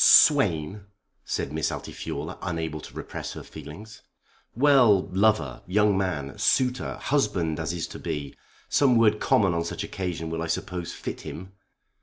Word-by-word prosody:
"Swain!" 100 - +5 0.4
said 70 - -3
Miss 80 0 0
Altifiorla, 75 +5 -6
unable 80 -4 -3
to - - -11
repress - - -6
her - - -8
feelings. 110 +1 -11 0.5
"Well; 125 -7 +5
lover, 85 - +2
young 105 +2 +3
man, 80 -8 -2
suitor, 125 -1 +1
husband 95 - 0
as 80 0 -2
is 85 -2 -3
to - - -8
be. 75 -4 -4 0.3
Some 135 -4 +4
word 105 -2 +4
common 95 -4 +3
on 85 0 0
such 85 - -4
occasion 85 -4 -4
will 80 0 -2
I 85 - -2
suppose 90 -1 -3
fit - - -6
him?" 95 +3 -8
90 Hz, 150 wpm, -26 LUFS, 80-105 Hz, 0.5 s, Swain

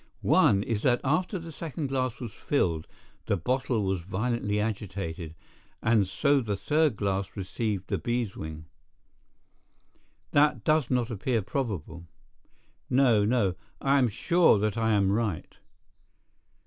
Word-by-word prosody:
One 100 0 +4
is 110 -2 -2
that 120 -1 +3
after 175 +8 0
the 165 -1 -8
second 155 -1 -5
glass 130 -3 -2
was 120 -4 -6
filled 85 - -1 0.4
the 100 - +1
bottle 125 +3 0
was 95 -2 -1
violently 105 +3 -1
agitated, 95 -6 -4 0.4
and 110 -4 +2
so 140 +8 +2
the 105 -4 -2
third 150 +2 +2
glass 100 -1 -1
received 100 0 -3
the - - -1
beeswing. 95 -10 -3 1.7
That 145 -6 +3
does 155 -4 +2
not 125 -2 0
appear 115 +1 -1
probable. 95 - -4 0.8
No, 125 -5 +4
no, 110 -5 +2 0.3
I 140 +1 +3
am 125 -3 +3
sure 170 - +3
that 105 +1 0
I 115 -1 +1
am 100 -2 +3
right." 105 -5 -2
110 Hz, 130 wpm, -28 LUFS, 100-130 Hz, 1.7 s, One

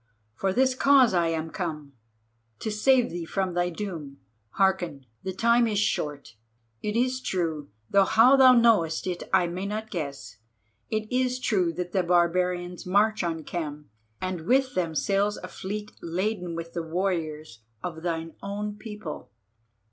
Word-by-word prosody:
For 190 - -1
this 260 +5 +3
cause 260 -3 +5
I 170 -2 +3
am 160 -1 -2
come, 150 -7 -5 0.6
to 220 - -4
save 245 +4 +3
thee 175 0 -4
from 185 +2 -2
thy 175 0 +1
doom. 165 -7 -6 0.4
Hearken, 180 -8 +1 0.2
the 190 - -3
time 235 +5 +3
is 210 -2 -1
short. 145 - -2 0.4
It 210 0 -2
is 255 +2 +1
true—though 160 - 0
how 245 +7 +6
thou 260 -2 +8
knowest 220 -10 +3
it 180 -2 -3
I 190 -2 +4
may 180 +3 -4
not 215 +1 -4
guess—it 135 - -7
is 255 0 +1
true 190 -9 +1
that 175 +1 -4
the 190 - +2
barbarians 175 0 +1
march 205 +3 +2
on 165 -2 -2
Khem, 150 -5 -5 0.3
and 185 -3 -4
with 260 0 +3
them 170 -3 -1
sails 200 +5 +1
a 180 - -7
fleet 205 +3 -6
laden 180 0 -2
with 165 0 -6
the 170 - -2
warriors 160 - -3 0.2
of 170 -3 -5
thine 165 -1 -3
own 205 +1 -4
people. 210 -1 -8
180 Hz, 150 wpm, -26 LUFS, 165-210 Hz, 0.6 s, thou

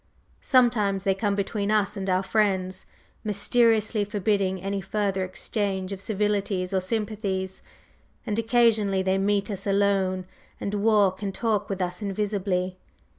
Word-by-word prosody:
Sometimes 215 -7 +3
they 195 - +3
come 200 +1 -1
between 200 +1 -2
us 210 -1 +2
and 195 -1 -3
our 185 +1 +2
friends, 190 -2 0 0.4
mysteriously 215 0 +2
forbidding 200 -2 0
any 195 +1 -3
further 195 0 -1
exchange 190 0 -3
of 195 -1 -5
civilities 200 -3 -1
or 190 - +2
sympathies, 200 -2 -3 0.6
and 210 +1 -1
occasionally 225 -4 +3
they 190 0 +1
meet 200 +1 +1
us 195 0 -4
alone 195 -2 +1 0.3
and 200 - -3
walk 205 -2 +3
and 195 -2 -3
talk 215 -3 0
with 195 -2 -1
us 180 +1 -4
invisibly. 195 -2 -1
200 Hz, 135 wpm, -26 LUFS, 190-210 Hz, 0.6 s, Sometimes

